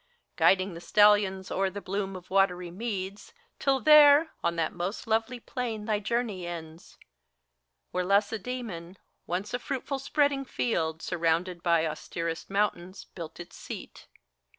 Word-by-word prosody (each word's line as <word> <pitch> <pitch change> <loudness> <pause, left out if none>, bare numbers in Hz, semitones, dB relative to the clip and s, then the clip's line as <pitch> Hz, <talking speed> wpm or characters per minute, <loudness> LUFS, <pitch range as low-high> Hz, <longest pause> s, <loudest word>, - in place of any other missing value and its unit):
Guiding 190 0 +3
the 170 - -9
stallions 205 -1 +4
o'er 195 0 +1
the 200 +2 -6
bloom 195 0 -3
of 185 0 -11
watery 180 -2 +2
meads, 195 -1 -5 0.3
Till 270 -1 +2
there, 300 +2 +7
on 170 - +1
that 165 -2 -1
most 180 +4 -4
lovely 225 +2 0
plain 230 -3 -4
thy 215 -2 0
journey 215 -4 -2
ends, 165 -1 -9 0.9
Where 180 - -1
Lacedemon, 200 -2 -1 0.3
once 185 +4 -3
a 245 - 0
fruitful 270 +2 -3
spreading 285 0 +1
field, 165 -11 -2
Surrounded 170 +1 0
by 170 -2 +3
austerest 165 +1 -4
mountains, 195 -2 -1
built 165 -2 -8
its 175 - -10
seat. - - -9
195 Hz, 135 wpm, -28 LUFS, 175-225 Hz, 0.9 s, there